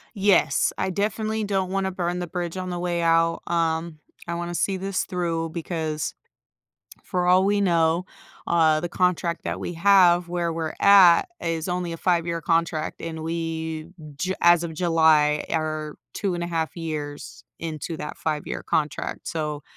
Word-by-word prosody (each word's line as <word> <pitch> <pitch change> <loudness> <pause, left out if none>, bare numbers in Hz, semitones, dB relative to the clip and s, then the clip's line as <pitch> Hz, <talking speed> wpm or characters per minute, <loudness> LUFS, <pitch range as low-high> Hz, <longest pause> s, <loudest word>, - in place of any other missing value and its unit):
Yes, 200 -1 +3
I 190 - -1
definitely 215 +3 -1
don't 190 -2 -1
wanna 195 0 0
burn 180 -1 -2
the 175 - -3
bridge 175 +1 -4
on 185 0 -4
the 175 - -3
way 175 -1 -1
out, 165 0 +3
um, 165 -1 -1 0.3
I 170 - -2
wanna 175 0 -4
see 190 +2 0
this 195 +1 -2
through, 165 -2 -2
because 160 -2 -3 0.9
for 180 -1 -1
all 185 +1 +5
we 205 +1 +2
know, 170 -2 +2 0.4
uh, 160 -2 +4
the 175 - -3
contract 175 -1 0
that - - -3
we 175 - -5
have- 175 -1 +5
where 175 -1 -1
we're 160 -1 -3
at- 190 -4 +7 0.2
is 165 0 -2
only 180 -1 -2
a - - -4
five-year 170 -1 0
contract, 165 -1 -1
and 160 -1 -5
we 160 -1 -3 0.3
Ju 185 +6 -2
as 175 0 +5
of 170 -1 -4
July 160 -3 +3
are 155 -1 -2 0.2
2.5 170 -4 -2
years 145 -6 -6
into 160 0 -5
that 150 - -6
five-year 155 -2 -3
contract. 150 -1 -2
So, 150 -2 -3
170 Hz, 155 wpm, -24 LUFS, 160-180 Hz, 0.9 s, at